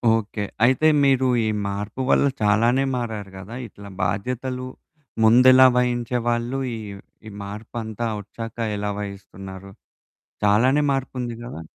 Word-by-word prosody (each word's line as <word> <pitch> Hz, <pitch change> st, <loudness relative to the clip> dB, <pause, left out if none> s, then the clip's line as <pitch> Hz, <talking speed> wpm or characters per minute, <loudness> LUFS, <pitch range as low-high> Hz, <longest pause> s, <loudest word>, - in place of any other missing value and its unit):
Okay. 110 Hz, -1 st, -3 dB, 0.2 s
అయితే 130 Hz, +6 st, +4 dB, 0.2 s
మీరు 130 Hz, -1 st, +3 dB, 0.2 s
ఈ -, -, 0 dB, 0.2 s
మార్పు 105 Hz, +5 st, -4 dB
వల్ల -, -, +4 dB, 0.2 s
చాలానే 115 Hz, +5 st, +3 dB
మారారు 110 Hz, -5 st, -4 dB
గదా! 95 Hz, +5 st, -9 dB
ఇట్లా 100 Hz, 0 st, -12 dB
బాధ్యతలు 125 Hz, +7 st, -2 dB, 0.6 s
ముందెలా 130 Hz, +3 st, +7 dB
వహించేవాళ్ళు? 120 Hz, 0 st, 0 dB, 0.2 s
ఈ -, -, -5 dB, 0.5 s
ఈ -, -, -7 dB
మార్పు 105 Hz, +4 st, -9 dB
అంతా 110 Hz, +1 st, -4 dB, 0.2 s
వచ్చాక 115 Hz, +2 st, -8 dB, 0.2 s
ఎలా 105 Hz, 0 st, -2 dB
వహిస్తున్నారు? 100 Hz, -1 st, -8 dB, 0.8 s
చాలానే 125 Hz, +8 st, +4 dB
మార్పు 135 Hz, -1 st, -3 dB
ఉంది 120 Hz, -1 st, -3 dB
గదా! 120 Hz, -9 st, -7 dB
115 Hz, 125 wpm, -23 LUFS, 100-125 Hz, 0.8 s, ముందెలా